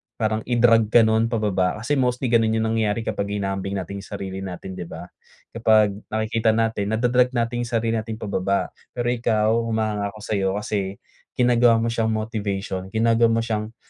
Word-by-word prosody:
parang 110 -1 0
i-drag 115 -2 +4
ka 115 +2 +5
no’n 110 +1 +2
pababa. 105 -6 0
Kasi 130 +6 -1
mostly 125 -1 0
ganun 110 -1 +3
yung 110 - +1
nangyayari 110 0 0
kapag 100 -1 -3
hinahambing 95 -1 -3
natin 100 +1 -5
yung 100 - -11
sarili 95 -2 -5
natin, 95 0 -7
'di 90 -2 -7
ba? - - -9 0.4
Kapag 110 -2 +3 0.2
nakikita 110 0 0
natin, 110 -3 0
nada-drag 125 +3 +2
natin 120 0 0
yung - - -7
sarili 115 0 +1
natin 110 0 -5
pababa. 100 -2 -1 0.2
Pero 120 -1 -1
ikaw, 110 -2 +1
humahanga 110 -2 -1
ako - - -11
sa'yo, 100 -3 0
kasi 100 -2 -2 0.4
ginagawa 120 -2 +4
mo 115 - 0
siyang 115 -1 0
motivation, 100 -4 -3
ginagawa 115 +1 +4
mo 115 0 +1
siyang 110 0 -3
110 Hz, 175 wpm, -23 LUFS, 100-115 Hz, 0.4 s, ka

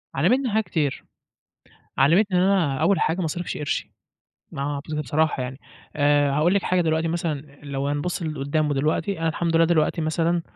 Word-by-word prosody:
علمتني 245 - +2
حاجات 220 +1 +1
كتير، 145 -5 -2 0.9
علمتني 180 +7 +4
إن - - +3
أنا 185 -8 +2
أول 200 - +3
حاجة 165 +3 +1
ما 185 - -1
أصرفش 175 +2 -3
قرشي. 150 -1 -3 0.6
ما 140 - -4
ه 145 0 -2 0.2
بصراحة 150 0 0
يعني. 130 +1 -6 0.4
آآ، 145 -1 +3
هاقول 155 +6 +2
لِك 200 - +2
حاجة 185 0 +1
دلوقتي 160 -1 +1
مثلًا، 150 -4 -4
لو 140 -1 -3
هنبُصّ 145 +6 -2
لقدّام 155 0 -1
ودلوقتي، 155 +7 -1
أنا 165 - +1
الحمد 165 +1 0
لله 165 - +5
دلوقتي 165 0 +1
مثلًا 165 +2 0
160 Hz, 170 wpm, -24 LUFS, 145-175 Hz, 0.9 s, لله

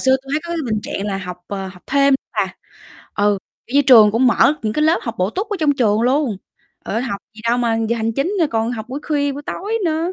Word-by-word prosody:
xưa 265 0 +4
tui 270 - -11
thấy 305 - +1
có 340 - -8
cái 335 -2 -2
bình 215 - 0
trạng 200 - -4
là 195 -2 -2
học, 180 -2 -6
ờ, 195 -1 -4
học 185 -1 -14
thêm 280 0 +3 0.2
bà, - - -1 0.6
ừ, 205 0 +2 0.3
kiểu 250 - -9
như, 285 - +6
trường 235 -6 +7
cũng 240 +4 +3
mở 250 +5 +4
những 215 -1 -1
cái 300 - 0
lớp 320 +2 +4
học 230 - -4
bổ 185 +2 +1
túc 390 - -3
ở 410 - -1
trong 300 -2 +3
trường 215 -4 +2
luôn, 255 -2 +1 0.5
trời - - -4
ơi, 230 - 0
học 240 -6 -3 0.2
gì 215 - -12
đâu 240 +1 +2
mà 230 -2 +1
giờ 235 - +1
hành 225 0 -1
chính, 275 - -1
ơ, 325 - +4
còn 225 0 0
học 220 -2 -6
buổi 270 +3 -5
khuya, 285 -2 +1
buổi 285 +1 -7
tối 430 +4 -2
nữa, 330 +2 0
245 Hz, 275 wpm, -19 LUFS, 215-290 Hz, 0.6 s, trường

